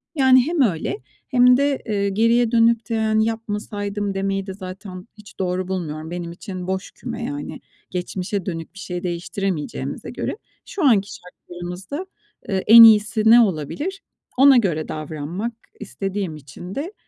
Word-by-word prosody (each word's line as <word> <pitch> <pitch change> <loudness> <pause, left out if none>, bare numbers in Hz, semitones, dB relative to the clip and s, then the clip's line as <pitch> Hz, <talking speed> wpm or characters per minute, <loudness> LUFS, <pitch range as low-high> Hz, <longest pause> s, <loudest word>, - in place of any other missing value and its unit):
Yani 260 -2 +5
hem 335 -2 +1
öyle, 175 - 0 0.3
hem 250 -1 +5
de, 280 0 0
eee, 200 -3 0
geriye 230 +3 +2
dönük 230 0 +3
de 225 -1 0
hani 220 0 +2
"Yapmasaydım." 205 -2 -3
demeyi 195 0 -2
de 190 - -5
zaten 185 0 -9
hiç 210 -1 -15
doğru 185 0 -1
bulmuyorum. 160 -4 -4
Benim 175 -1 -5
için 185 0 -7
boş 190 0 -3
küme - - -7
yani, 145 0 -5 0.3
geçmişe 185 +1 -3
dönük 165 -3 -5
bir 195 - -12
şey 180 -2 -5
değiştiremeyeceğimize 175 0 -4
göre. - - -4 0.3
Şu 385 - -4
anki 205 -6 +4
şartlarımızda, 180 - -8 0.4
eee, 190 -2 0
en 230 +1 +11
iyisi 220 0 +6
ne 230 +2 +8
olabilir? 235 - -1 0.4
Ona 270 0 +7
göre 170 -9 0
davranmak 155 +8 -5 0.3
istediğim 195 -4 -4
için 150 +6 -10
de 325 +9 -4
195 Hz, 150 wpm, -21 LUFS, 180-230 Hz, 0.4 s, en